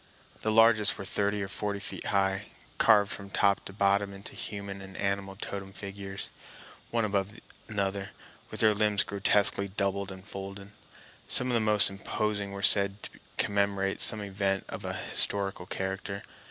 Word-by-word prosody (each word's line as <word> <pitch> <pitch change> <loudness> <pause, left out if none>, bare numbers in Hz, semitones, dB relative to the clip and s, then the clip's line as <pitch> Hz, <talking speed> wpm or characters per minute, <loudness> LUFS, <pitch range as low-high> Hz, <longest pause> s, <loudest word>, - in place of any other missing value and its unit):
The 110 - 0
largest 110 -2 +5
were 100 - -5
thirty 105 +1 0
or - - -4
forty 100 +1 -3
feet - - -6
high, 95 0 +1 0.3
carved 105 -2 +5
from 100 -1 -6
top 100 0 +2
to - - -7
bottom 100 0 +1
into 100 0 -8
human 100 -1 -6
and 95 0 -10
animal 100 -1 -2
totem 95 -1 -6
figures, 100 0 -6 0.6
one 115 -1 +1
above 100 0 -1 0.3
another, 100 -1 -2 0.4
with - - -4
their 110 -1 +5
limbs 105 -1 +2
grotesquely 100 0 +3
doubled 100 0 -2
and 95 0 -10
folded. 100 0 -8 0.6
Some 125 - +5
of - - 0
the 115 - +3
most 105 -2 +6
imposing 100 0 -2
were 100 0 -6
said 100 0 +3
to - - -5 0.2
commemorate 100 -1 0
some 110 -2 +7
event 100 -1 -1
of - - -7
an - - -3 0.2
historical 100 -2 +1
character. 95 +1 -4
100 Hz, 160 wpm, -29 LUFS, 95-105 Hz, 0.6 s, some